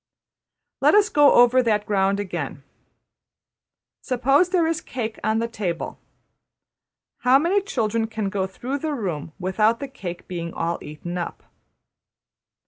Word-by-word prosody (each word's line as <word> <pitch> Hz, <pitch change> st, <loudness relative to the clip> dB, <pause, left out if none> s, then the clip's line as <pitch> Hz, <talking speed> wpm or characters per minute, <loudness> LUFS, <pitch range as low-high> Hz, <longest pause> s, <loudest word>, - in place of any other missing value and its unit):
'' -, -, -61 dB
Let -, -, +5 dB
us 420 Hz, 0 st, +5 dB
go 290 Hz, -1 st, +5 dB
over 245 Hz, +1 st, +6 dB
that 210 Hz, -3 st, +1 dB
ground 195 Hz, -1 st, +1 dB
again. 170 Hz, -8 st, -4 dB, 1.4 s
Suppose 270 Hz, +7 st, +2 dB
there 360 Hz, -3 st, +2 dB
is 325 Hz, -1 st, 0 dB
a -, -, -19 dB
cake 225 Hz, -4 st, -5 dB
on 220 Hz, +1 st, +1 dB
the 230 Hz, +1 st, 0 dB
table. 190 Hz, -7 st, -4 dB, 1.2 s
How 255 Hz, +2 st, +5 dB
many 350 Hz, +8 st, +2 dB
children 225 Hz, -, -1 dB
can 220 Hz, -3 st, -3 dB
go 190 Hz, -1 st, -1 dB
through 255 Hz, +9 st, -4 dB
the 305 Hz, 0 st, -2 dB
room 165 Hz, -, -4 dB
without 215 Hz, +5 st, +1 dB
the 280 Hz, -, -4 dB
cake 180 Hz, -10 st, -8 dB
being 170 Hz, -2 st, -5 dB
all 170 Hz, +1 st, -2 dB
eaten 175 Hz, +4 st, -6 dB
up? 170 Hz, -, -5 dB
220 Hz, 145 wpm, -23 LUFS, 185-270 Hz, 1.4 s, over